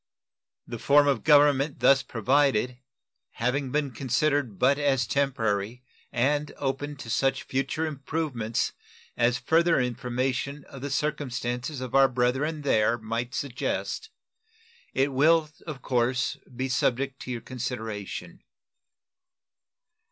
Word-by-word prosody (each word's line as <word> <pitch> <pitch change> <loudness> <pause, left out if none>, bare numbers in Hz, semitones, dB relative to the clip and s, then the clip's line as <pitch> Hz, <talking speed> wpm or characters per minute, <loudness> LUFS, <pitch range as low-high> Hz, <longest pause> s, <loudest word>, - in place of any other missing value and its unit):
The - - -7
form 145 +1 +5
of 140 - +1
government 145 -1 +4
thus 135 0 +5
provided 125 0 +1 0.5
having 125 +3 -1
been 145 -1 0
considered 135 -2 0
but 140 +6 +3
as 135 -4 +2
temporary, 115 -4 -1 0.3
and 145 +4 +1
open 145 +2 -3
to 130 -4 -9
such 135 +2 +1
future 135 +4 -1
improvements 140 -6 -2 0.4
as 120 +1 +2
further 165 +5 +3
information 125 +3 -2
of 135 - -11
the 145 - -4
circumstances 130 -2 -2
of 130 -2 -6
our 135 0 +6
brethren 130 +5 0
there 120 -3 +3
might 115 +2 -4
suggest, 140 - -3 0.9
it 135 +1 +2
will 155 +3 +4 0.2
of 140 -5 -7
course 125 +1 +1 0.2
be 130 +2 -2
subject 130 +1 0
to 125 - -6
your 120 -2 -4
consideration. 110 -5 -5
135 Hz, 115 wpm, -27 LUFS, 125-145 Hz, 0.9 s, our